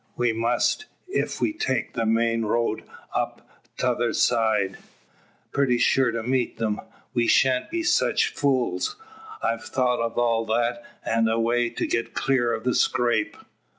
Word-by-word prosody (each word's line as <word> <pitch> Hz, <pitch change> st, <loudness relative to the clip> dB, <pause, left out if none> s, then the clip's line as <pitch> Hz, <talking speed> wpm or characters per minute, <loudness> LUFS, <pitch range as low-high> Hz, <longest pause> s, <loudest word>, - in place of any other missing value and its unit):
"We 120 Hz, -1 st, +2 dB
must, 120 Hz, -, 0 dB, 0.3 s
ef -, -, -1 dB
we 315 Hz, -, +1 dB
take 130 Hz, -, -2 dB
the 115 Hz, -2 st, -1 dB
main 115 Hz, 0 st, +2 dB
road 110 Hz, 0 st, 0 dB, 0.3 s
up -, -, -3 dB, 0.3 s
tother -, -, 0 dB
side 105 Hz, -4 st, +1 dB, 0.7 s
pretty 130 Hz, -3 st, +2 dB
sure 130 Hz, +1 st, +3 dB
to 115 Hz, -1 st, -3 dB
meet 125 Hz, -1 st, -1 dB
'em. 110 Hz, -2 st, -1 dB, 0.3 s
We 120 Hz, -1 st, +1 dB
shan't 130 Hz, -1 st, +3 dB
be 340 Hz, 0 st, -2 dB
sech 355 Hz, +1 st, +2 dB
fools. 135 Hz, -, +1 dB, 0.5 s
I've 115 Hz, -1 st, -1 dB
thought 125 Hz, 0 st, +1 dB
o' 115 Hz, 0 st, -1 dB
all 115 Hz, -1 st, +1 dB
that, 120 Hz, +2 st, 0 dB, 0.2 s
an' 115 Hz, 0 st, +2 dB
a 110 Hz, +1 st, +1 dB
way 120 Hz, +1 st, +1 dB
to 115 Hz, -, -3 dB
get 115 Hz, -, -2 dB
clear 130 Hz, -3 st, +1 dB
of 110 Hz, -, -3 dB
the 125 Hz, -, +1 dB
scrape." 120 Hz, -4 st, +1 dB
120 Hz, 150 wpm, -25 LUFS, 115-125 Hz, 0.7 s, sure